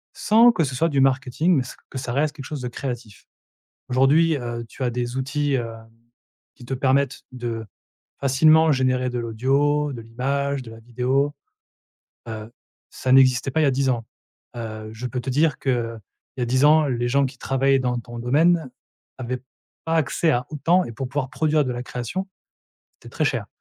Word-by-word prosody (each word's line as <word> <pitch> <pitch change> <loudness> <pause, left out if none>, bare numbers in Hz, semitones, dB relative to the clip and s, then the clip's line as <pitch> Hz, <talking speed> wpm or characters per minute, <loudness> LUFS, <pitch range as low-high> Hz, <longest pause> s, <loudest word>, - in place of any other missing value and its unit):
sans 230 +3 +5
que 190 -8 0
ce 130 -3 -3
soit 165 +6 +2
du 140 -3 +2
marketing, 135 +5 +2
mais 130 - +2
s 125 - -9
que - - -7
ça 125 -2 -4
reste 150 +2 0
quelque 135 -3 -8
chose 145 -2 -5
de 125 - -3
créatif? 120 -4 -7 0.6
Aujourd'hui, 140 +6 +4
heu, 120 -2 -5
tu 130 - -7
as 125 - +1
des 120 0 -3
outils, 145 +2 -1
hem, 115 -3 -4 0.7
qui 125 - -13
te 135 - -4
permettent 135 +1 +1
de 120 -3 -4 0.6
facilement 155 +4 +5
générer 130 -2 +1
de 125 0 -3
l'audio, 140 +6 +1
de 125 - -6
l'image, 135 +4 -2
de 115 - -10
la 115 - -11
vidéo, 125 +5 0 0.9
heu, 110 0 -7 0.4
ça 130 - -1
n'existait 130 0 +5
pas 160 - +1
il - - +4
y - - +4
a - - +4
10 135 +1 0
ans, 120 -3 0 0.5
heu, 110 -2 -6
je 115 +3 -6
peux 125 +1 -3
te 130 +2 -4
dire 150 +4 +2
qu'il 115 -4 -1 0.4
y - - -2
a - - +2
10 130 +3 +2
ans 155 0 +6
les 120 -2 -1
gens 140 +3 +3
qui 130 0 -10
travaillaient 135 +1 +2
dans 125 -1 -1
ton 120 0 -9
domaine 155 +5 +2 0.5
avaient 125 0 -4 0.4
pas 165 - -1
accès 160 +1 +2
à 125 -1 0
autant 170 +4 +2
et - - -7
pour 125 +3 -5
pouvoir 135 -1 -3
produire 150 +1 +1
de 130 - -2
la 120 0 -4
création, 125 +11 -4 0.7
c'était - - -15
très - - 0
cher - - -1
130 Hz, 195 wpm, -23 LUFS, 120-145 Hz, 0.9 s, ans